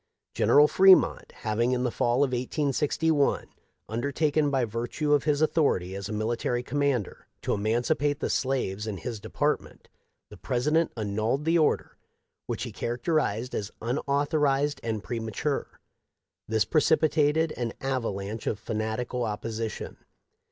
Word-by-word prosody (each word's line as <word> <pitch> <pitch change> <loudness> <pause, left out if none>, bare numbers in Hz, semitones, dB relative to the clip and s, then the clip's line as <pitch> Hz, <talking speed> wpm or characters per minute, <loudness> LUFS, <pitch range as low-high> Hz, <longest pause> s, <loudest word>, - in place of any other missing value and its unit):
General 145 +1 +5
Fremont 190 +2 +5
having 115 +3 -1
in 125 0 0
the 125 - 0
fall 120 +4 +2
of 135 - 0
1861 145 +3 +1 0.4
undertaken 145 +6 0
by 135 -3 +1
virtue 120 +7 -1
of 145 - +2
his 150 0 +2
authority 115 - +1
as 100 0 -5
a - - -4
military 115 +3 -1
commander 140 -6 -1 0.2
to - - 0
emancipate 120 +7 0
the - - -1
slaves 110 -6 -1
in 105 -3 -3
his 115 +1 -5
department, 145 +8 -2 0.4
the - - -12
President 150 +7 +1
annulled 110 +7 -1
the 165 +1 +3
order, 155 - 0 0.5
which - - -3
he - - -5
characterized 120 -1 -1
as 100 -1 -3
unauthorized 145 +3 0
and 110 -2 -3
premature. 120 +4 -3 0.7
This 110 -1 +1
precipitated 155 0 +2
an 120 -2 -3
avalanche 115 -5 -3
of 105 - 0
fanatical 110 +4 -3
opposition. 110 +1 -4
125 Hz, 130 wpm, -27 LUFS, 110-145 Hz, 0.7 s, General